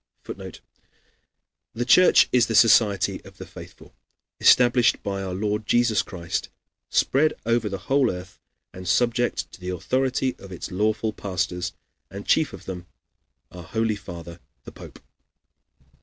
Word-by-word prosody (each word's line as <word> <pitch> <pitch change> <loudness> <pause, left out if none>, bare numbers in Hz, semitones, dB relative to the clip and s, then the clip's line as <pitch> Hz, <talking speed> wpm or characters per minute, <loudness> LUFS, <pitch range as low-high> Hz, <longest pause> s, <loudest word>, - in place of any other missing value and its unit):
[Footnote: - - -9 1.1
"The 120 +1 -2
Church 180 +9 +6
is 125 -1 +3
the 115 - -2
society 105 -3 +4
of - - -15
the - - -8
faithful, - - -13 0.5
established 120 0 +4
by 100 -1 -3
our 95 -2 -4
Lord 105 +2 -2
Jesus 120 -4 +3
Christ, 85 -3 -5 0.4
spread 155 +3 +2
over 115 -2 +1
the 95 - -4
whole 135 -2 +2
earth, 90 0 -7 0.3
and 90 0 -9
subject 120 +5 0
to - - -13
the 90 - -5
authority 130 +7 -1
of 100 - -12
its 90 -1 -7
lawful 110 +3 0
pastors, 90 -3 -3 0.4
and 100 +2 -8
chief 160 -2 +2
of - - -11
them 90 -2 -7 0.6
our 90 - -10
Holy 110 +5 -1
Father 85 -3 -10 0.2
the - - -11
Pope." - - -12
105 Hz, 140 wpm, -24 LUFS, 90-120 Hz, 1.1 s, Church